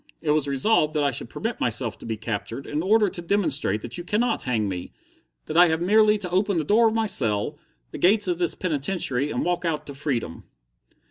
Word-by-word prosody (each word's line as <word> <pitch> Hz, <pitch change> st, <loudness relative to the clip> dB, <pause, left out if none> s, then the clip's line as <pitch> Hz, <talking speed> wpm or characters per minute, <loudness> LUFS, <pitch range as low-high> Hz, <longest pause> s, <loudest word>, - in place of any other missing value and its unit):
It 155 Hz, -, -1 dB
was 150 Hz, -1 st, +1 dB
resolved 150 Hz, +2 st, +1 dB
that 150 Hz, -, +1 dB
I 140 Hz, -, +2 dB
should 120 Hz, -, -5 dB
permit -, -, -4 dB
myself -, -, -1 dB
to -, -, -10 dB
be 110 Hz, -1 st, -3 dB
captured, 115 Hz, +4 st, -5 dB
in 150 Hz, +1 st, -2 dB
order 210 Hz, +4 st, +3 dB
to 180 Hz, -, -5 dB
demonstrate 155 Hz, -, 0 dB
that 120 Hz, +9 st, -5 dB
you -, -, -5 dB
cannot 225 Hz, +6 st, 0 dB
hang 115 Hz, -5 st, -1 dB
me, 90 Hz, -2 st, -6 dB, 0.5 s
that -, -, -6 dB
I 175 Hz, +1 st, +7 dB
have 160 Hz, 0 st, 0 dB
merely 215 Hz, +2 st, +4 dB
to 190 Hz, -3 st, -5 dB
open 195 Hz, +1 st, +1 dB
the 160 Hz, -, +1 dB
door 220 Hz, +8 st, +4 dB
of 220 Hz, -, -1 dB
my 225 Hz, -1 st, +1 dB
cell, 110 Hz, -, +1 dB, 0.3 s
the -, -, -7 dB
gates 205 Hz, +3 st, +3 dB
of 175 Hz, -1 st, -1 dB
this 175 Hz, -2 st, +1 dB
penitentiary, 145 Hz, -4 st, -1 dB
and -, -, -2 dB
walk 175 Hz, 0 st, -1 dB
out 155 Hz, -3 st, -2 dB
to 140 Hz, -, -8 dB
freedom." 135 Hz, -, -4 dB
160 Hz, 220 wpm, -24 LUFS, 135-195 Hz, 0.5 s, I